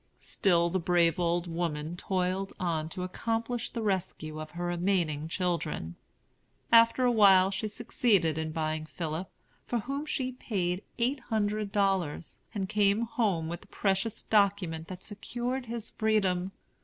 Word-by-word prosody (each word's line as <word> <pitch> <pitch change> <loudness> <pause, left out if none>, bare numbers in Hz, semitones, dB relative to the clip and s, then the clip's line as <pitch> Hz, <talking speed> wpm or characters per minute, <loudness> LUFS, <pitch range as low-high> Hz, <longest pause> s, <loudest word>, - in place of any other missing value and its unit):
Still 170 -3 +2
the 185 - +1
brave 170 -1 +3
old 170 0 +1
woman 165 -2 -3
toiled 185 +1 -1
on 160 -3 -1
to 180 +2 -5
accomplish 230 +5 -2
the 230 - -4
rescue 180 -6 -2
of 155 - -7
her 175 0 -5
remaining 175 -4 0
children. 165 - -2 0.8
After 230 +2 +6
a 245 - +4
while 195 -4 +6
she 215 +2 -2
succeeded 205 -6 +1
in 160 0 -2
buying 155 -1 -2
Philip, 165 +2 -4 0.4
for 240 - 0
whom 275 +7 -3
she 260 -4 -1
paid 190 -7 -2 0.2
eight 250 +4 +1
hundred 210 -3 -1
dollars, 190 -6 0
and 200 -4 -2
came 205 +1 +3
home 220 - 0
with 170 +1 -5
the - - -17
precious 195 +2 -1
document 195 -6 +1
that 185 0 -8
secured 245 +4 -4
his 230 -1 -3
freedom. 195 -4 +1
190 Hz, 145 wpm, -30 LUFS, 170-220 Hz, 0.8 s, After